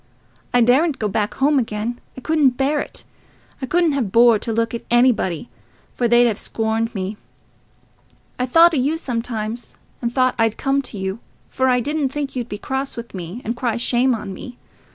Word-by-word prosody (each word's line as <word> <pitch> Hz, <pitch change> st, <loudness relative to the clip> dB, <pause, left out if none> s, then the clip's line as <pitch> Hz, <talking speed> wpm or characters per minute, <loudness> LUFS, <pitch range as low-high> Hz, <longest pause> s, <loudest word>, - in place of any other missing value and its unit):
I 245 Hz, -, +4 dB
daredn't 275 Hz, +6 st, +3 dB
go 215 Hz, -, -1 dB
back 205 Hz, +1 st, -1 dB
home 285 Hz, +1 st, +3 dB
again—I 230 Hz, +2 st, -5 dB
couldn't 275 Hz, -2 st, +2 dB
bear 285 Hz, +2 st, +1 dB
it. -, -, -5 dB, 0.6 s
I 260 Hz, -, -3 dB
couldn't 340 Hz, 0 st, +2 dB
have 260 Hz, -9 st, -1 dB
bore 230 Hz, -1 st, +6 dB
to 230 Hz, -, -3 dB
look 230 Hz, +1 st, 0 dB
at 235 Hz, -, -4 dB
anybody, 240 Hz, -7 st, +2 dB, 0.5 s
for 240 Hz, -, 0 dB
they'd 240 Hz, +1 st, +5 dB
have 220 Hz, -3 st, +1 dB
scorned 225 Hz, +1 st, -2 dB
me. 195 Hz, +2 st, -3 dB, 1.2 s
I 250 Hz, -, 0 dB
thought 335 Hz, +6 st, +6 dB
o' -, -, +1 dB
you 285 Hz, +5 st, +1 dB
sometimes, 230 Hz, -5 st, -4 dB, 0.3 s
and 235 Hz, -1 st, -1 dB
thought 255 Hz, 0 st, +2 dB
I'd 225 Hz, -1 st, +2 dB
come 275 Hz, 0 st, +1 dB
to 245 Hz, -5 st, -7 dB
you, 190 Hz, +2 st, -3 dB, 0.3 s
for 260 Hz, -, 0 dB
I 250 Hz, -1 st, +3 dB
didn't 290 Hz, +1 st, -1 dB
think 280 Hz, 0 st, -4 dB
you'd 245 Hz, -2 st, -3 dB
be 205 Hz, -, -4 dB
cross 265 Hz, +4 st, -4 dB
with 235 Hz, 0 st, -7 dB
me, 185 Hz, +5 st, -7 dB
and 230 Hz, +3 st, -2 dB
cry 240 Hz, -2 st, -1 dB
shame 245 Hz, +1 st, +2 dB
on 210 Hz, -3 st, -6 dB
me. 245 Hz, +6 st, -9 dB
240 Hz, 190 wpm, -21 LUFS, 225-270 Hz, 1.2 s, bore